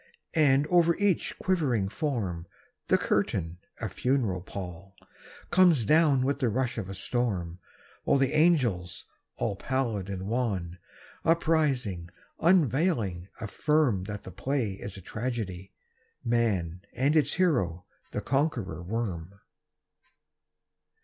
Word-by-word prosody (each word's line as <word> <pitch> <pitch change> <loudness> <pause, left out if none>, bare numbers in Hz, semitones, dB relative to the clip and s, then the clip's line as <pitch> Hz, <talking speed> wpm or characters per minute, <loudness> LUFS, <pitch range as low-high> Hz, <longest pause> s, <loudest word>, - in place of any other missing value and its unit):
And, 145 -3 +4
over 170 0 +4
each 200 -3 0
quivering 140 - +1
form, 100 - -3 0.4
The - - +4
curtain, 85 +2 -1 0.2
a - - -2
funeral 120 -9 0
pall, 95 +1 -8 0.6
Comes 175 - +5
down 150 -2 +4
with 140 +1 0
the 125 - +2
rush 125 +1 -1
of 95 -3 -5
a 95 - -5
storm 95 -5 -2 0.5
And 140 - +4
the 135 -1 +2
angels, 125 - +2 0.3
all 100 - -1
pallid 115 -4 -2
and 95 -1 -4
wan, 100 -7 -2 0.4
Uprising, 140 - +1 0.3
unveiling, 135 - +2
affirm 120 -3 +1
That 105 0 -6
the 95 - -9
play 130 +3 -1
is 95 0 -7
the 95 - -9
tragedy, 105 -5 -4 0.5
"Man," 100 -8 0
And 135 +5 +1
its 145 -2 +3
hero 95 - +1 0.3
the - - -3
Conqueror 120 - -1
Worm. 95 -3 -4
115 Hz, 115 wpm, -28 LUFS, 95-145 Hz, 0.6 s, Comes